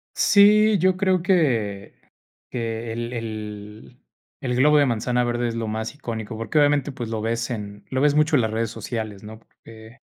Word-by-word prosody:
Sí, 210 +1 +5
yo 185 +1 +2
creo 190 -2 +2
que 120 - 0 0.6
que 115 -1 -4
el 120 +1 -5
el 110 0 -7 0.4
el 125 -2 -1
globo 150 +4 +5
de 145 - +5
manzana 125 0 0
verde 120 0 -1
es 115 - -4
lo 115 -1 -3
más 110 +3 -4
icónico, 115 -6 -6
porque 115 +6 -1
obviamente, 145 -1 +2
pues 120 -4 -6
lo 110 -1 -3
ves 115 +1 -2
en 105 -3 -6
lo 130 - -2
ves 145 -1 +3
mucho 150 0 +3
en 125 - +3
las 110 - -1
redes 110 0 -2
sociales, 110 -5 -6
¿no? 110 +1 -10
Porque, 115 +1 -16
115 Hz, 185 wpm, -23 LUFS, 110-145 Hz, 0.6 s, Sí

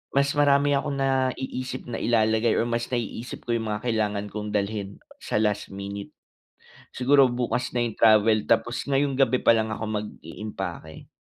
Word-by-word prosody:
mas 140 0 +3
marami 145 0 +3
akong 140 0 0
naiisip 130 -1 -1
na 115 - -3
ilalagay 110 0 +2
or - - +2
mas 115 0 -2
naiisip 120 0 -4
ko - - -4
'yung 115 -1 -1
mga 105 -1 -3
kailangan 105 -3 -1
kong 105 0 -4
dalhin 100 -1 -2 0.2
sa - - -5
last 105 -1 0
minute. 100 +1 -7 0.8
Siguro 135 +1 +5
bukas 125 0 -1
na 120 - +2
'yung 115 - -4
travel 110 -1 +4
tapos 120 - +1
ngayong 140 0 +2
gabi 130 -1 +3
pa - - +6
lang 110 -1 0
ako 110 - -4
mag-iimpake. 100 -5 -6
115 Hz, 160 wpm, -25 LUFS, 105-130 Hz, 0.8 s, pa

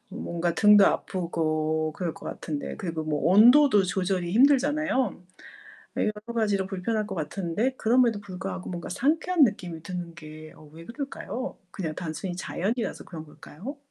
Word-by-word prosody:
뭔가 170 -5 -3
등도 210 -1 +7
아프고 155 -3 -1
그럴 170 -3 -3
것 - - -11
같은데 150 -2 -5
그리고 165 -5 -4
뭐 150 -1 -1
온도도 240 +2 +7
조절이 180 -1 -1
힘들잖아요. 280 - +2 0.7
여러 210 - +1 0.2
가지로 205 -4 +1
불편할 210 +3 -2
것 200 - -5
같은데 185 - -2
그럼에도 230 -2 +3
불구하고 185 -1 -6
뭔가 175 -1 -5
상쾌한 310 - +2
느낌이 180 -8 -3
드는 175 -1 -6
게 155 -1 -11
어 155 - -15
왜 165 +1 -11
그럴까요? 260 - -6
그냥 165 -5 -4
단순히 175 +2 -5
자연이라서 220 +6 -3
그런 160 -3 -8
걸까요? 185 - -10
190 Hz, 345 characters per minute, -26 LUFS, 165-230 Hz, 0.7 s, 등도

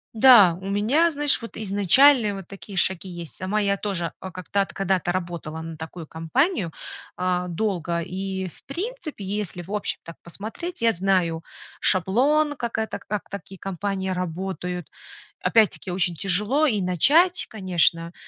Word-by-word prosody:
Да, 215 -7 +8
у 195 - -5
меня, 240 +12 +3
знаешь, 295 -3 +2
вот 230 - -9
изначальные 215 - +4
вот 195 -3 -8
такие 195 0 -9
шаги 185 +1 +2
есть. 170 -5 -7
Сама 195 +3 -1
я 200 -1 +1
тоже 185 -5 -3
о 190 - -7
как-то 185 +3 -2
от 195 - -3
когда-то 190 -2 0
работала 170 -3 -4
на 165 0 -7
такую 160 +1 -8
компанию, 170 - 0 0.5
э, 180 0 0
долго 170 -3 -1
и, 190 +2 -4
в - - -21
принципе, 350 - -5
если, 195 -3 -3
в 190 - -11
общем, 210 -1 -2
так 165 - -11
посмотреть, 225 - -6
я 230 - +5
знаю 175 -4 0 0.4
шаблон, 280 - +2
как 235 -3 -4
это 220 0 -2
как 210 -2 -5
такие 195 0 -8
компании 195 +1 -3
работают. 180 0 -4 0.5
Опять-таки 215 -4 +2
очень 175 -1 +1
тяжело 210 - +2
и 215 -7 0
начать, 310 - +4
конечно. 175 -4 +1
195 Hz, 150 wpm, -24 LUFS, 175-220 Hz, 0.5 s, Да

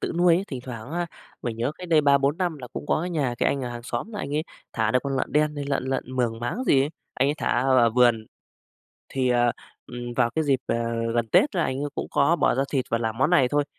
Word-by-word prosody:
tự - - -2
nuôi 175 -1 +5
ấy. 185 +3 0
Thỉnh 130 -3 -5
thoảng 115 0 -7
á, 175 +1 -1 0.4
mình 120 -2 -3
nhớ 120 +5 -1
cách 180 - -8
đây 160 -2 +5
3-4 140 +1 +3
năm 175 -5 -1
là 125 - -8
cũng - - -7
có - - +1
cái 180 +2 -3
nhà 140 -7 0
cái - - +3
anh 140 - -1
ở 125 - -3
hàng 120 0 -7
xóm 215 - -4
là 210 - -5
anh 140 -6 -4
ấy 155 - +1 0.3
thả 110 -1 +1
được 125 - +3
con 140 -1 -2
lợn - - -2
đen 150 0 +2
hay 145 - -3
lợn 140 -2 0
lợn 130 -1 -3
Mường 115 -3 0
máng 120 - -3
gì 135 - +4
ấy. 145 - -2 0.2
Anh 135 +2 +2
ấy 145 - +1
thả - - -1
ở 130 +2 +2
ở 115 -1 +5
vườn, 120 -2 +3 0.8
thì, 130 -1 0
ờ, 120 -1 +3 0.3
ừm, 120 0 -6
vào 120 - +3
cái 160 -1 +1
dịp, 135 -3 +2
ờ, - - 0 0.4
gần 120 -1 +1
Tết 285 - +4
là 175 - +2
anh 130 +2 -2
ấy 145 - -1
cũng - - -3
có 150 +5 +3
bỏ - - +2
ra 135 - +1
thịt 135 -3 +1
và 115 - +2
làm 115 -1 -3
món 135 - +3
này 140 -8 +4
thôi. 145 +2 +1
135 Hz, 285 wpm, -25 LUFS, 120-150 Hz, 0.8 s, nuôi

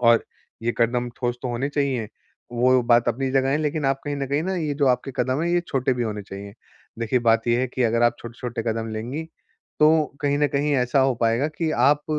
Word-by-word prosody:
और 115 -1 +4 0.4
ये 120 +1 0
कदम 120 +1 +1
ठोस 120 -1 -2
तो 125 - -2
होने 120 +3 -2
चाहिए। 135 -6 -1 0.4
वो 125 +1 +3
बात 120 0 +3
अपनी 130 +3 -1
जगह 135 0 +2
है, 145 - +2
लेकिन 155 -1 -1
आप 135 0 +1
कहीं 145 -1 -3
न 140 -1 -2
कहीं 145 +3 0 0.2
ये 145 - -1
जो 140 -1 +1
आपके 130 +2 0
कदम 130 +4 0
है, 170 - 0
ये 175 - +3
छोटे 130 -1 +1
भी 120 - -2
होने 105 -3 -3
चाहिए। 100 +1 -9 0.4
देखिए 115 +2 +1
बात 115 +1 +3
ये 120 +1 +3
है 130 - +1
कि 130 +1 -2
अगर 115 +1 +2
आप 120 0 +2
छोटे-छोटे 120 0 -6
कदम 115 0 -4
लेंगी, 125 +9 -4 0.6
तो 155 +1 +5 0.2
कहीं 145 0 +1
न 145 - +3
कहीं 145 +1 +1
ऐसा 125 +1 +2
हो 135 -1 +3
पाएगा 115 +6 +2
कि 165 -2 0
आप 145 +4 +3
125 Hz, 225 wpm, -23 LUFS, 120-140 Hz, 0.6 s, तो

